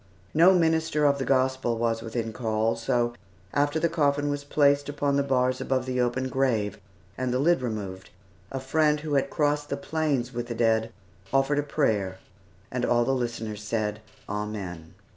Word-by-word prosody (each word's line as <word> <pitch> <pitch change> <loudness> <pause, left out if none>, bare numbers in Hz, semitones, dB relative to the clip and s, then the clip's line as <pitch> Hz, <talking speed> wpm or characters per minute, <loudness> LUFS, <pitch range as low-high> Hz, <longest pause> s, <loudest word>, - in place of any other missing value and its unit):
No 175 +4 +6
minister 160 -3 +2
of 140 -1 +3
the 135 - -1
Gospel 130 -3 +1
was 115 -1 0
within 115 0 -3
call, 110 0 0
so, 120 0 0 0.4
after 145 +2 +1
the 170 - +2
coffin 145 -3 +1
was 145 0 -3
placed 145 0 +2
upon 145 -1 0
the 140 - +3
bars 130 -2 +1
above 130 -1 0
the 125 -1 0
open 125 +2 0
grave, 120 -6 0 0.4
and 130 -1 0
the 125 - +1
lid 160 +2 +3
removed, 100 -6 -5 0.4
a 135 - -3
friend 150 +3 +2
who 155 -1 -4
had 135 -1 +2
crossed 145 -1 0
the - - -2
plains 145 -6 -1
with 120 0 -3
the 120 - -4
dead, 115 -1 +2 0.4
offered 135 +2 +2
a - - +3
prayer, 110 -11 0 0.5
and 125 -1 -2
all 120 -1 +3
the 135 - +1
listeners 115 -4 -3
said, 105 -1 -2 0.3
"Amen." 100 -6 -5
130 Hz, 175 wpm, -26 LUFS, 115-145 Hz, 0.5 s, No